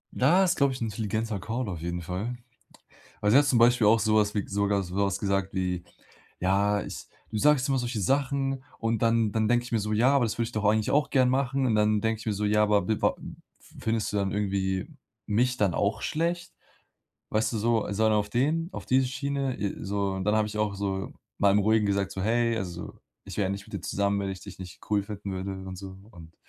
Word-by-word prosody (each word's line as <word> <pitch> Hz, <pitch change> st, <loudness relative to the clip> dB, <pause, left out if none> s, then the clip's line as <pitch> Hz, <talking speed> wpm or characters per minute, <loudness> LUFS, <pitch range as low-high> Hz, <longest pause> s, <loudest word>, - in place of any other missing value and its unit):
Da 170 Hz, +9 st, +4 dB
ist, 175 Hz, -1 st, +1 dB
glaube 140 Hz, -2 st, +3 dB
ich, 130 Hz, -, -7 dB
'n 115 Hz, -, -1 dB
intelligenter 110 Hz, 0 st, -2 dB
Call 115 Hz, +5 st, -3 dB
auf 85 Hz, -5 st, -5 dB
jeden 85 Hz, +1 st, -3 dB
Fall. 95 Hz, +8 st, -4 dB, 0.8 s
Weil 105 Hz, -, +2 dB
sie 115 Hz, -, +6 dB
hat 145 Hz, -, +6 dB
zum 130 Hz, -3 st, +3 dB
Beispiel 120 Hz, -1 st, +5 dB
auch 110 Hz, +1 st, +5 dB
sowas 110 Hz, -1 st, +2 dB
wie 105 Hz, -, -2 dB
sogar 100 Hz, 0 st, +1 dB
sowas 95 Hz, +1 st, -1 dB
gesagt 100 Hz, -1 st, -1 dB
wie: 90 Hz, -2 st, -2 dB, 0.6 s
„Ja, 100 Hz, +2 st, +2 dB
ich -, -, -8 dB, 0.2 s
du -, -, -4 dB
sagst 145 Hz, +1 st, +3 dB
immer 135 Hz, -, +2 dB
solche 120 Hz, -3 st, -2 dB
Sachen 135 Hz, +2 st, 0 dB
und 115 Hz, -1 st, -1 dB
dann 115 Hz, -2 st, +2 dB
dann 110 Hz, 0 st, +1 dB
denke 120 Hz, +1 st, +2 dB
ich 120 Hz, -, -10 dB
mir 115 Hz, -, +2 dB
so: 105 Hz, +1 st, -2 dB
Ja, 120 Hz, +6 st, +4 dB
aber 130 Hz, -, +3 dB
das 110 Hz, -, -3 dB
würde 115 Hz, -, +2 dB
ich 120 Hz, -, -8 dB
doch 110 Hz, -2 st, -2 dB
eigentlich 110 Hz, +1 st, +2 dB
auch 145 Hz, 0 st, +2 dB
gern 130 Hz, -2 st, +4 dB
machen.“ 135 Hz, +1 st, +1 dB
Und 115 Hz, -, +2 dB
dann 105 Hz, 0 st, +3 dB
denke 110 Hz, 0 st, -1 dB
ich -, -, -11 dB
mir 110 Hz, -, +1 dB
so: 105 Hz, +1 st, -2 dB
„Ja, 105 Hz, +1 st, +3 dB
aber 105 Hz, -3 st, +2 dB
wi 110 Hz, -2 st, 0 dB
wa -, -, +5 dB, 0.5 s
f -, -, -21 dB
findest 110 Hz, -2 st, -1 dB
du -, -, -1 dB
dann 100 Hz, -1 st, 0 dB
irgendwie 95 Hz, -2 st, -1 dB, 0.4 s
mich 125 Hz, +4 st, +1 dB
dann 100 Hz, -4 st, +2 dB
auch 105 Hz, +2 st, 0 dB
schlecht?“ 170 Hz, +2 st, -2 dB, 0.8 s
Weißt 110 Hz, +2 st, +1 dB
du 115 Hz, -, -1 dB
so 115 Hz, 0 st, +1 dB
so 110 Hz, +2 st, +1 dB
einen 110 Hz, -, +3 dB
auf 105 Hz, 0 st, 0 dB
den 155 Hz, -, 0 dB
auf -, -, -7 dB
diese 130 Hz, 0 st, +3 dB
Schiene, 140 Hz, 0 st, -2 dB
äh, 100 Hz, -2 st, -2 dB
so 100 Hz, 0 st, -1 dB
und 95 Hz, 0 st, -3 dB
dann 105 Hz, -, +2 dB
habe 110 Hz, -1 st, +1 dB
ich 105 Hz, -, -7 dB
auch 105 Hz, -2 st, 0 dB
so 95 Hz, -1 st, -3 dB, 0.3 s
mal 100 Hz, -1 st, +4 dB
im 100 Hz, -, +4 dB
Ruhigen 110 Hz, +1 st, +3 dB
gesagt 100 Hz, -1 st, 0 dB
so: 95 Hz, -, -4 dB
„Hey, 115 Hz, +2 st, +1 dB
also, 90 Hz, -5 st, -6 dB, 0.3 s
ich -, -, -8 dB
wäre 100 Hz, -, +2 dB
ja -, -, -1 dB
nicht 100 Hz, 0 st, -5 dB
mit -, -, -12 dB
dir -, -, -3 dB
zusammen, 100 Hz, 0 st, 0 dB
wenn 100 Hz, -1 st, -2 dB
ich 95 Hz, -2 st, -6 dB
dich 100 Hz, +1 st, -11 dB
nicht 95 Hz, 0 st, -10 dB
cool 105 Hz, -1 st, +3 dB
finden 100 Hz, -1 st, -6 dB
würde,“ 95 Hz, +1 st, -4 dB, 0.2 s
und 95 Hz, -, -6 dB
so 95 Hz, 0 st, -9 dB
und 80 Hz, -1 st, -13 dB
105 Hz, 240 wpm, -27 LUFS, 100-120 Hz, 0.8 s, sie